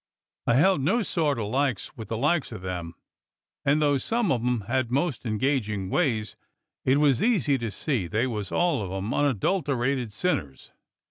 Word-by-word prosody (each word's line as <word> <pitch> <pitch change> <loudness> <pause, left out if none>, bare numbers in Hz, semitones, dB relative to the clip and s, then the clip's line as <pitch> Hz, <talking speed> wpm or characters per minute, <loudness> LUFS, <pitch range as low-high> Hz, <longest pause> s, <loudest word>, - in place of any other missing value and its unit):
I 120 - +4
held 165 +2 +4
no 225 - +2
sort 155 -7 0
o' 110 -3 -2
likes 130 -2 -1
with 110 -3 -8
the 115 - -3
likes 150 +4 +1
o' 110 - -5
them, 90 -3 -5 0.7
and 145 +2 +3
though 145 -2 +3
some 230 - 0
of 120 -3 0
'em 125 -2 +1
had 120 +4 -1
most 140 0 -1
engagin* 110 -4 0
ways, 115 -11 0 0.5
it 130 +2 +3
was 145 -4 +3
easy 175 - +2
to 115 -1 -3
see 115 - -2
that - - -17
they 110 +3 +1
was 105 -6 -4
all 170 -8 +1
of 95 -3 -4
'em 95 +4 -3
un 145 - +2
adulterated 135 - 0
sinners. 100 - -2
130 Hz, 185 wpm, -26 LUFS, 110-145 Hz, 0.7 s, I